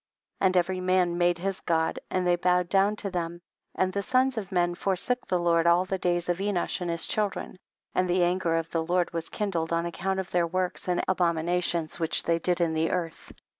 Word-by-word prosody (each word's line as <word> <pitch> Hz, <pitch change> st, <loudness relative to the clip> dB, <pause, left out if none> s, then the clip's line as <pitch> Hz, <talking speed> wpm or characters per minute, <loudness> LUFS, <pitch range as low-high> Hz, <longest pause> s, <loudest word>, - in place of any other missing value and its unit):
5. -, -, +1 dB
And 185 Hz, 0 st, +1 dB
every 185 Hz, +1 st, +1 dB
man 185 Hz, -1 st, +2 dB
made 175 Hz, 0 st, +3 dB
his 190 Hz, +2 st, -3 dB
God 160 Hz, -1 st, 0 dB
and 185 Hz, -1 st, 0 dB
they 175 Hz, 0 st, +4 dB
bowed 180 Hz, 0 st, +1 dB
down 200 Hz, +2 st, +3 dB
to 200 Hz, -2 st, -5 dB
them, 170 Hz, -1 st, -3 dB, 0.4 s
and 185 Hz, 0 st, 0 dB
the 200 Hz, -, -1 dB
sons 255 Hz, +4 st, +2 dB
of 205 Hz, -3 st, -5 dB
men 175 Hz, -1 st, +1 dB
forsook 195 Hz, +7 st, -2 dB
the 185 Hz, -, +1 dB
Lord 170 Hz, -1 st, +2 dB
all 175 Hz, +2 st, +4 dB
the 190 Hz, 0 st, -3 dB
days 175 Hz, -1 st, 0 dB
of 175 Hz, 0 st, 0 dB
Enosh 195 Hz, -2 st, -1 dB
and 175 Hz, -, -2 dB
his 170 Hz, 0 st, 0 dB
children; 205 Hz, -3 st, -2 dB, 0.3 s
and 185 Hz, 0 st, +1 dB
the 180 Hz, 0 st, +3 dB
anger 175 Hz, -1 st, +1 dB
of 165 Hz, 0 st, -2 dB
the 165 Hz, -1 st, 0 dB
Lord 175 Hz, +1 st, 0 dB
was 165 Hz, -1 st, -3 dB
kin 210 Hz, -2 st, -2 dB
dled 165 Hz, -2 st, -2 dB
on 170 Hz, 0 st, +1 dB
account 190 Hz, +3 st, -2 dB
of 190 Hz, -, -5 dB
their 175 Hz, -1 st, +2 dB
works 185 Hz, +2 st, -2 dB
and 180 Hz, -1 st, +1 dB
abominations 170 Hz, -2 st, 0 dB
which 165 Hz, -1 st, 0 dB
they 170 Hz, 0 st, +1 dB
did 180 Hz, +1 st, 0 dB
in 170 Hz, -2 st, +1 dB
the 160 Hz, +1 st, +1 dB
earth. 170 Hz, -3 st, -4 dB
180 Hz, 225 wpm, -27 LUFS, 170-185 Hz, 0.4 s, they